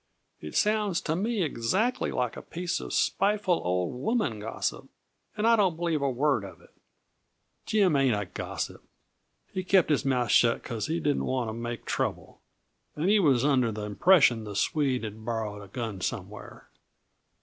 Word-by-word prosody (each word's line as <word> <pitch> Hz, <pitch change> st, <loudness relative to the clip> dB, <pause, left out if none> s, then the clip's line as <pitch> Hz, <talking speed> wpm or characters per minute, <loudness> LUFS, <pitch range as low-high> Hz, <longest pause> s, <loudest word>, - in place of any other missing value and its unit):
"It 75 Hz, -, -8 dB
sounds 210 Hz, -4 st, +2 dB
to 160 Hz, -, -1 dB
me 210 Hz, +2 st, 0 dB
exactly 190 Hz, -, 0 dB
like 125 Hz, -2 st, -1 dB
a -, -, -7 dB
piece 175 Hz, 0 st, -3 dB
of -, -, -7 dB
spiteful 200 Hz, -3 st, +1 dB
old 90 Hz, 0 st, -1 dB
woman 130 Hz, -, -1 dB
gossip, 110 Hz, +2 st, -4 dB, 0.5 s
and 210 Hz, -, 0 dB
I 230 Hz, 0 st, +6 dB
don't 190 Hz, -6 st, +2 dB
believe 165 Hz, -3 st, -1 dB
a 140 Hz, -, +1 dB
word 130 Hz, -3 st, +1 dB
of 95 Hz, -3 st, -10 dB
it!" -, -, -22 dB, 0.9 s
"Jim 195 Hz, -7 st, +3 dB
ain't 130 Hz, -6 st, +3 dB
a 105 Hz, -, -3 dB
gossip. 90 Hz, -, -5 dB, 0.7 s
He 185 Hz, -, -2 dB
kept 185 Hz, -3 st, +3 dB
his 150 Hz, -, +2 dB
mouth 125 Hz, -5 st, +1 dB
shut 115 Hz, -1 st, +4 dB
because 115 Hz, -2 st, -4 dB
he 165 Hz, +2 st, -1 dB
didn't 145 Hz, -3 st, 0 dB
want 125 Hz, -3 st, -1 dB
to -, -, -4 dB
make 120 Hz, +1 st, -5 dB
trouble, -, -, -3 dB, 0.5 s
and 160 Hz, +5 st, 0 dB
he 215 Hz, -, +5 dB
was 140 Hz, -8 st, +3 dB
under 130 Hz, -5 st, +3 dB
the 105 Hz, 0 st, -5 dB
impression 120 Hz, -, +4 dB
the 105 Hz, -2 st, -7 dB
Swede 135 Hz, +1 st, 0 dB
had 110 Hz, 0 st, -7 dB
borrowed 110 Hz, -3 st, -3 dB
a 100 Hz, -, -11 dB
gun 110 Hz, -2 st, -5 dB
somewhere. -, -, -6 dB
135 Hz, 170 wpm, -28 LUFS, 110-180 Hz, 0.9 s, I